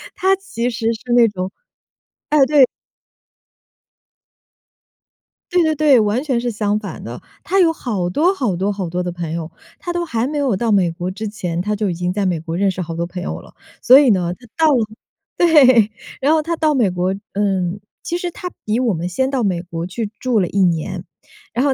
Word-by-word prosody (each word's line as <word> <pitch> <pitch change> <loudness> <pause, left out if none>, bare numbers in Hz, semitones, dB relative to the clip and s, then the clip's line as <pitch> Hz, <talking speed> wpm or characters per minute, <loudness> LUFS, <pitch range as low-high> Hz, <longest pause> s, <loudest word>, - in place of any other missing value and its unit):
他 380 +1 +2
其 245 -11 -3
实 230 -1 -1
是 220 - -9
那 240 -1 +6
种 190 -3 -4 0.8
哎， 295 -2 +5
对 280 -1 +6 2.9
对 355 0 +3
对 315 -1 +1
对， 290 -4 +5
完 215 +4 +1
全 265 -6 0
是 245 - -1
相 210 -1 0
反 210 - -8
的。 - - -7 0.2
他 390 - +1
有 335 -3 +5
好 210 - -3
多 320 - +2
好 245 - -1
多 195 +4 0
好 195 -4 -4
多 180 +2 -2
的 180 - -3
朋 170 -2 -5
友。 165 0 -4 0.3
他 350 -3 -4
都 345 0 -1
还 235 -6 -1
没 295 +1 -3
有 270 -7 +1
到 225 +4 0
美 185 -4 +3
国 175 +2 -4
之 215 +3 -5
前， 180 -5 -3
他 210 +3 -1
就 210 -1 -1
已 - - -1
经 180 +1 -2
在 200 +1 -1
美 175 -3 0
国 165 +1 -5
认 200 +1 +2
识 185 0 -5
好 165 -1 -5
多 170 - -2
朋 180 +1 -7
友 - - -4
了。 - - -17 0.3
所 260 +2 +8
以 280 -4 +4
呢， 180 -4 +1
他 245 +6 -16
到 315 -3 +4
了 235 -4 +2 0.5
对， 260 -10 +5 0.3
然 285 +4 +3
后 320 - +3
他 335 +2 -2
到 310 -2 +1
美 235 -8 +2
国 180 +1 -1 0.2
嗯， 195 -2 0 0.2
其 345 - -3
实 355 -1 -4
他 360 - -6 0.2
比 215 +2 0
我 245 -4 +1
们 170 +1 -3
先 260 +9 0
到 265 -3 -1
美 185 -4 0
国 170 -1 -5
去 205 +4 -4
住 250 -4 +1
了 180 - +1
1 195 - -2
年。 175 +1 -1 0.5
然 250 +4 +1
后 275 - +3
215 Hz, 225 characters per minute, -19 LUFS, 180-270 Hz, 2.9 s, 所